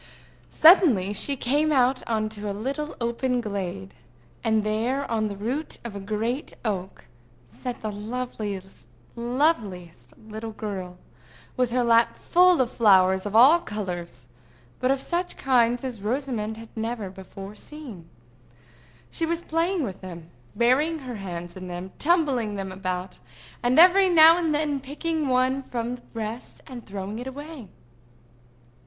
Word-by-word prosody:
Suddenly 280 - +6
she 280 +7 +1
came 290 +5 +1
out 260 -2 +3
on 215 -1 0
a 205 -1 -4
little 275 +9 -4
open 245 +2 0
glade; 190 - -4 0.5
and 220 -1 +2
there, 235 +6 -1
on 220 -1 +1
the 200 -1 -6
root 255 +10 -3
of 235 -4 -7
a - - -4
great 225 - -3
oak, 190 -3 -4 0.4
sat 240 - -7
the 215 - -2
loveliest 210 -3 -6 0.3
little 220 - -2
girl, 190 -4 -6 0.6
with 250 -1 +1
her 245 +1 +1
lap 230 0 +3
full 360 -3 +4
of 245 - 0
flowers 190 -3 +4
of 205 - -5
all 270 +9 +8
colors, 175 - -6 0.5
but 255 - +1
of 270 0 +2
such 355 +5 -2
kinds 245 -2 +2
as 245 -6 -5
Rosamond 220 -2 -2
had 225 0 -11
never 225 -3 -3
before 195 +1 -10
seen. 220 - -10 1.0
She 330 - -1
was 335 +1 -1
playing 330 +2 0
with 195 -7 -5
them—burying 185 - -1
her 255 -6 -7
hands 175 -3 -6
in 185 -1 -8
them, 180 +1 -6
tumbling 280 - +2
them 195 -1 -4
about, 185 -1 -4 0.4
and 245 +3 +2
every 370 +2 +7
now 325 -1 +8
and 330 -3 0
then 295 -2 0
picking 300 +3 -3
one 255 +1 +2
from 245 -1 -4
the - - -19
rest, 225 +2 -6
and 245 -3 -10
throwing 200 +2 -5
it 250 - -6
away. 285 -2 -8
235 Hz, 140 wpm, -25 LUFS, 200-275 Hz, 1.0 s, all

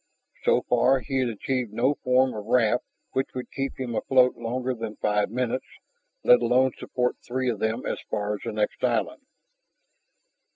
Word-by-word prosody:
So - - +3
far 125 +2 +3
he 135 0 -2
had 125 -2 +1
achieved 120 +1 -2
no 125 +6 +2
form 130 -1 +2
of 105 -1 -7
raft 120 -1 +3 0.3
which 130 0 -2
would 125 - -5
keep 135 -1 -4
him 125 -3 -3
afloat 125 +2 +3
longer 125 +2 -2
than 115 -2 -6
five 105 -1 +1
minutes, 125 +2 -2 0.6
let - - +6
alone 130 +1 +3
support 125 -1 -1
three 130 0 -1
of 110 - -5
them 110 +3 -1
as - - -2
far 105 0 -1
as 105 - -4
the - - -3
next 105 -1 -2
island. - - 0
125 Hz, 170 wpm, -26 LUFS, 115-130 Hz, 0.6 s, let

